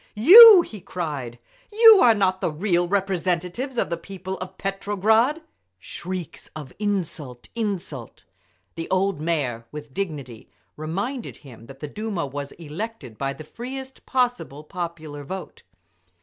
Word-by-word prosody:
"You!" 380 - +10
he 210 - -11
cried. 145 -11 -5 0.3
"You 445 -1 +8
are 235 -2 +6
not 190 -2 +1
the - - 0
real 175 +2 0
representative 190 +5 -2
of 170 - -1
the 170 - -1
people 190 +1 -7
of 185 - -8
Petrograd!" 215 - +1 0.3
Shrieks 175 - -7
of 145 -4 -9
"Insult! 165 - -4
Insult!" 190 - -5 0.5
The 165 - -6
old 190 -3 0
Mayor, 135 -9 -2
with 150 -2 -9
dignity, 145 - -6 0.3
reminded 200 - -5
him 115 -3 -13
that 135 +1 -13
the 150 - -4
Duma 205 0 -4
was 140 +1 -6
elected 160 - -8
by 135 0 -2
the 155 - -10
freest 260 - -9
possible 245 - -1
popular 160 -4 -7
vote. 190 +6 -8
180 Hz, 135 wpm, -23 LUFS, 150-215 Hz, 0.5 s, You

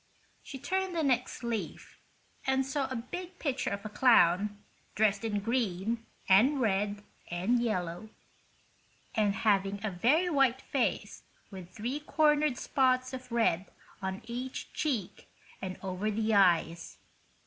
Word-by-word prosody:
She 270 - -8
turned 370 +6 -2
the 325 - +1
next 255 -3 0
leaf, 235 -2 -5 0.5
and 265 0 +2
saw 270 0 -1
a 260 - -5
big 355 +10 -6
picture 275 -6 -1
of 200 +1 -5
a - - -4
clown, 205 -3 +4 0.4
dressed 205 0 +2
in 210 -2 -1
green 225 0 -1 0.2
and 245 +10 +5
red 205 -2 0 0.3
and 190 +8 +1
yellow, 180 -3 -2 1.0
and 205 -2 +1
having 200 -2 +1
a 215 - -1
very 265 - +2
white 270 -5 +2
face 270 -3 -1 0.3
with 185 -3 -9
three 240 +9 -4
cornered 300 -2 +2
spots 255 -1 +1
of 255 -1 -8
red 195 -6 +1 0.3
on 190 0 -4
each 245 +3 -6
cheek 245 - -3 0.3
and 185 -1 -5
over 190 +2 -2
the 220 +1 0
eyes. 170 -4 +2
230 Hz, 135 wpm, -30 LUFS, 195-265 Hz, 1.0 s, and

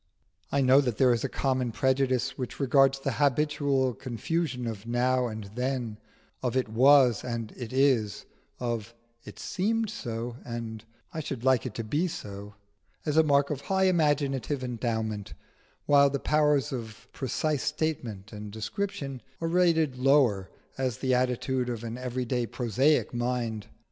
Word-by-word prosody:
I 140 - +2
know 130 +2 +6
that 125 -6 -2
there 125 -2 +5
is 115 - -1
a - - -1
common 130 -3 0
prejudice 130 +1 +1
which 125 -2 -5
regards 135 0 +4
the 135 0 -1
habitual 140 -1 +1
confusion 125 +3 -2
of 110 -1 -5
now 125 +1 +2
and 110 -1 -6
then, 125 -3 -2 0.4
of 125 0 -1
it 130 - +1
was 125 0 +5
and 115 -3 -4
it 120 -3 -7
is, 130 -7 +2 0.3
of 115 -2 -3 0.3
it - - -10
seemed 215 +2 -1
so 120 - -5
and 115 -2 -6 0.3
I 160 - -3
should 135 -5 -5
like 130 -1 +3
it 115 - -8
to 115 - -3
be 150 +11 0
so, 100 - -7 0.5
as 150 -2 0
a 160 - +7
mark 140 -2 +3
of 140 -2 -3
high 190 0 +1
imaginative 145 -5 +1
endowment, 110 -4 -3 0.5
while 140 -1 +6
the 140 - -1
power 150 0 +3
of 115 -4 -7
precise 145 +2 -1
statement 115 -10 -3
and 105 0 -7
description 135 - -4 0.2
is 165 0 -2
rated 165 -6 +3
lower, 130 -8 +3 0.3
as 130 -4 -1
the 130 -1 0
attitude 125 0 0
of 120 -2 -4
an 115 +1 -5
everyday 125 -1 -2
prosaic 130 +8 +1
mind. 120 -3 -2
130 Hz, 155 wpm, -28 LUFS, 115-140 Hz, 0.5 s, a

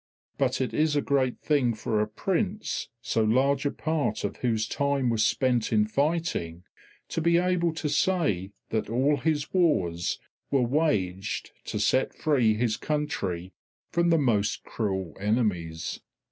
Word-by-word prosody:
But 135 -1 +1
it 130 - -1
is 155 -1 +2
a 145 - +3
great 130 -3 +1
thing 130 -6 +2
for 110 0 0
a 105 - 0
prince 190 - -2
so 110 - +1
large 135 +5 +2
a - - -1
part 160 -2 -1
of - - -3
whose 110 -3 0
time 140 -3 0
was 110 -2 +2
spent 120 +1 +1
in 105 -2 +4
fighting 140 - -1 0.5
to 165 - -2
be 170 +1 +4
able 180 -1 +2
to 160 - -2
say 145 - +1 0.2
that 110 -2 -1
all 135 +6 +2
his 145 +1 -1
wars 90 - +1 0.3
were 135 -3 +2
waged 105 - 0
to 105 - -3
set 130 +5 +2
free 125 -8 +2
his 110 -1 0
country 95 - -2 0.4
from 170 0 +2
the 165 - +5
most 110 -8 +1
cruel 95 -6 -3
enemies. 95 -7 -1
125 Hz, 150 wpm, -27 LUFS, 105-150 Hz, 0.5 s, the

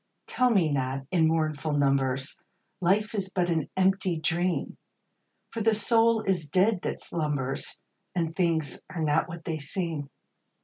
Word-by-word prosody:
Tell 250 0 +2
me 195 -8 +3
not, 135 -2 -1
in 165 -3 +4
mournful 155 -1 0
numbers, 135 -1 +1 0.4
Life 200 +5 +2
is 195 -3 -2
but 175 -2 0
an 160 -3 0
empty 190 -2 +2
dream! 175 +3 -1 0.7
For 230 - -4
the 220 0 +3
soul 225 +1 +3
is 180 -6 -1
dead 185 +4 +3
that - - -3
slumbers. 145 -5 -2 0.4
And 165 -2 -1
things 165 -5 0
are 165 -3 -3
not 155 +3 +2
what 170 0 -8
they 160 -2 -2
seem. 150 -1 -3
165 Hz, 145 wpm, -27 LUFS, 150-190 Hz, 0.7 s, in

